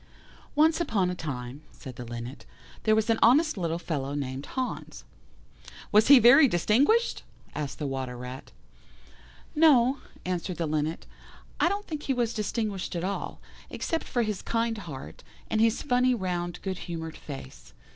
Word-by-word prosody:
"Once 315 +3 +4
upon 200 - +1
a - - -2
time," 135 -5 -6
said 130 -2 -10
the 125 - -7
Linnet, 120 +2 -8 0.4
"there 215 -1 +5
was 220 0 +1
an 225 - +1
honest 305 +7 +5
little 170 -4 -1
fellow 145 -5 -3
named 135 -1 -4
Hans." 260 -1 -4 0.9
"Was 210 +1 +5
he 280 0 +10
very 260 +5 +8
distinguished?" 265 - +2 0.3
asked 150 -2 -4
the 150 - -4
Water 130 -2 -4
rat. 125 +2 -8 1.0
"No," 280 -5 +5 0.3
answered 180 -1 -3
the 170 - -1
Linnet, 155 +1 -2 0.5
"I 345 - +4
don't 405 +2 -3
think 305 -2 -5
he 270 - -1
was 240 -2 0
distinguished 210 -3 -2
at 170 - -2
all, 200 +2 -4 0.3
except 330 - -3
for 240 -2 0
his 215 -3 -3
kind 230 -1 -1
heart, 150 -9 -9 0.3
and 215 - +2
his 225 0 +2
funny 250 -2 +3
round 180 -4 -3
good 190 -2 -3
humoured 160 -1 -5
face. 65 - -10
190 Hz, 155 wpm, -27 LUFS, 150-245 Hz, 1.0 s, he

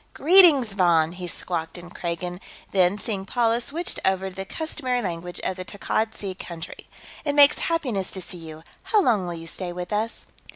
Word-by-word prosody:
"Greetings, 310 - +6
Von!" 170 -4 +3
he 180 0 -6
squawked 165 -1 -4
in 175 0 -11
Kragan, 175 +1 -4 0.3
then, 190 0 +3
seeing 205 -3 -3
Paula, 230 +3 +1
switched 330 +8 -2
over 190 0 +1
to - - -16
the 195 0 -5
customary 260 -1 -2
language 175 -4 -4
of 190 - -2
the 185 - -5
Takkad 215 +3 -2
Sea 195 -2 -4
country. 170 -3 -8 0.4
"It 290 -2 -1
makes 290 0 +7
happiness 250 - -1
to 190 - -4
see 180 - -8
you. 160 -1 -10 0.2
How 435 - +3
long 210 - +2
will 175 - -4
you 165 0 -8
stay 175 +2 -4
with 180 +2 -5
us?" 220 +2 -2
190 Hz, 190 wpm, -24 LUFS, 175-240 Hz, 0.4 s, makes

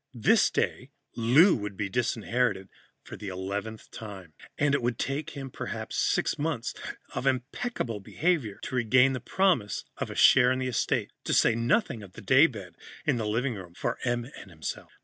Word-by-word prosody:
This 115 - +4
day, - - -1 0.3
Lou 135 - +5
would 105 -3 -5
be 105 - -1
disinherited 110 -2 0 0.3
for - - -9
the 105 - -8
eleventh 100 +4 -5
time, 95 -7 -9 0.2
and 145 -1 +2
it 140 - +2
would 120 -1 -1
take 145 +2 -3
him 135 -2 -6
perhaps - - -5
six - - +1
months 150 -6 -2 0.4
of 135 - -2
impeccable 130 - -2
behavior 135 - -1
to - - -6
regain 125 +2 +4
the 130 - -2
promise 165 - +1
of - - -3
a - - -7
share 125 -1 +6
in 130 - +1
the 130 - -2
estate. 125 -3 0
To - - +1
say 115 - +5
nothing 120 - +1
of 95 -3 -12
the - - -10
daybed 125 - +3 0.3
in - - +2
the 110 -2 -2
living 120 +5 0
room 90 -4 -10
for 120 - -2
Em 120 -1 0
and - - -12
himself. 80 -3 -6
120 Hz, 180 wpm, -28 LUFS, 105-135 Hz, 0.4 s, share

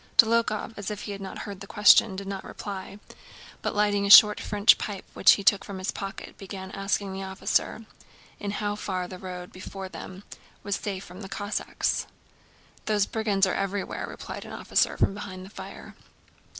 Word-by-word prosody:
Dólokhov, 230 -1 +3
as 205 0 -4
if 210 -1 -5
he - - -5
had 200 0 -6
not 190 - -7
heard 200 -3 -7
the 195 - -9
question, 205 0 +6
did 195 +1 -6
not 195 -1 -5
reply, 200 -1 -7 0.6
but - - -2
lighting 205 -1 +2
a - - -1
short 210 +1 +10
French 205 +1 +4
pipe 200 -3 -5
which 185 - +7
he 200 - -2
took 195 0 +4
from 200 - -7
his 185 0 -2
pocket 195 -1 -7
began 190 -1 -8
asking 195 0 -2
the 190 - -5
officer 190 +3 -1 0.5
in 205 - -4
how 205 0 -2
far 185 -3 -3
the 185 0 -9
road 180 -1 -7
before 190 +1 -8
them 185 +2 -9 0.4
was 200 -1 -1
safe 195 -2 -4
from 180 +3 -11
Cossacks. 205 +2 -2 0.8
"Those 210 -2 +2
brigands 210 -3 +1
are 190 - -1
everywhere," 195 0 -2
replied - - -7
an - - -10
officer - - +1
from - - +2
behind 190 -2 -7
the 195 - -13
fire. - - -10
200 Hz, 180 wpm, -27 LUFS, 190-205 Hz, 0.8 s, short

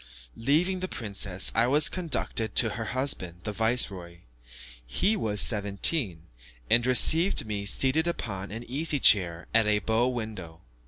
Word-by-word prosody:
Leaving 165 +10 +1
the 185 - -3
princess, 100 - -2
I 115 +1 +2
was 145 +4 +3
conducted 150 - -3
to 110 - +4
her 115 +2 -5
husband, 105 -9 -3
the 105 - -4
viceroy. 100 -6 -2 0.6
He 185 - 0
was 105 - 0
seventeen, 100 - +1 0.5
and 120 - +4
received 160 +8 +3
me 100 -2 -5
seated 135 +9 +1
upon 100 - -4
an 115 +3 -7
easy 145 +4 -1
chair 90 -7 +3
at 115 -1 +3
a 105 0 +3
bow 110 +3 0
window. 110 -10 -6
110 Hz, 145 wpm, -27 LUFS, 100-135 Hz, 0.6 s, to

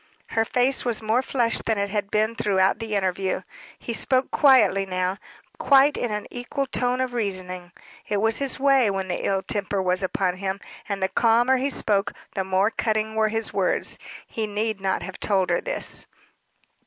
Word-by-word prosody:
Her 225 - +1
face 255 +3 +2
was 240 -3 0
more 220 +3 +2
flushed 240 -3 0
than 225 -2 +1
it 200 0 -1
had 205 -1 -2
been 215 +2 +1
throughout 195 -1 +2
the 225 -2 -3
interview. 190 -1 -1 0.3
He 235 - -5
spoke 260 +3 +1
quietly 225 -9 +5
now, 185 0 -2 0.4
quite 280 +1 +5
in 245 - -2
an 210 0 -3
equal 250 +3 -3
tone 250 -1 -1
of 255 -1 -1
reasoning; 185 -5 -4 0.4
it 205 - 0
was 225 +2 +2
his 275 -1 -1
way 270 -4 +4
when 190 -1 -3
the 175 - -2
ill 195 -1 0
temper 200 0 -2
was 185 0 +1
upon 185 -1 -1
him: 190 0 -3 0.3
and 200 -1 -2
the - - +3
calmer 235 +5 +3
he 270 +2 0
spoke, 205 -6 +1 0.2
the 190 - -1
more 190 +3 +1
cutting 220 -1 -1
were 220 0 +2
his 225 +1 -2
words. - - 0 0.3
He 220 -2 -4
need 210 0 -2
not 190 -1 -1
have 190 0 -8
told 190 -3 +1
her - - +1
this. - - -3
215 Hz, 185 wpm, -24 LUFS, 190-240 Hz, 0.4 s, quietly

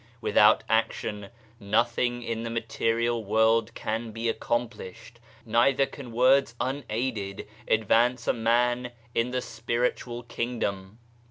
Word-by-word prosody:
Without 105 -1 +4
action 110 -2 -1 0.3
nothing 120 +3 0
in 115 -1 -3
the 115 - -4
material 115 0 -1
world 110 +2 +2
can 115 +1 -3
be 115 +1 -4
accomplished, 115 -1 -4 0.3
neither 125 +4 +3
can 135 -3 -10
words 130 +1 +3
unaided 120 -6 -3 0.2
advance 115 +2 +2
a - - +3
man 120 +2 +1 0.2
in 115 +1 +1
the 125 0 -2
Spiritual 120 +1 -2
Kingdom. 110 -4 -4
115 Hz, 110 wpm, -27 LUFS, 110-120 Hz, 0.3 s, Without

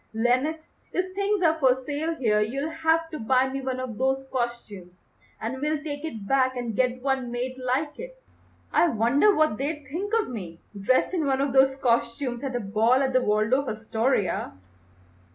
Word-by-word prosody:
Lenox, 255 +8 0 0.2
if 370 0 -1
things 400 0 0
are 320 -1 +3
for 260 -3 +4
sale 290 +5 -3
here 220 -8 +2
you'll 275 +9 -2
have 320 0 +1
to 310 - -5
buy 255 +3 +2
me 270 +1 -4
one 260 -1 -3
of 250 -4 -5
those 265 +1 0
costumes, 210 -8 -5 0.3
and 260 +4 -4
we'll 305 +1 +1
take 290 -1 -5
it 225 -11 -6
back 260 0 +2
and 235 -3 -3
get 250 +1 0
one 265 -3 0
made 245 +2 -3
like 275 +4 -1
it. - - -9 0.5
I 345 - +5
wonder 280 - +3
what 310 -8 +2
they'd 290 +1 -3
think 390 +7 -3
of 435 - -1
me 180 -9 -7 0.2
dressed 205 - +1
in 330 -5 0
one 270 -1 +1
of 275 -1 0
those 265 0 +5
costumes 240 0 0
at 265 -2 -3
a - - 0
ball 225 +5 +2
at 265 -1 -1
the 255 - +4
Waldorf 225 +5 +1
Astoria." 220 -1 -1
260 Hz, 185 wpm, -26 LUFS, 235-300 Hz, 0.5 s, I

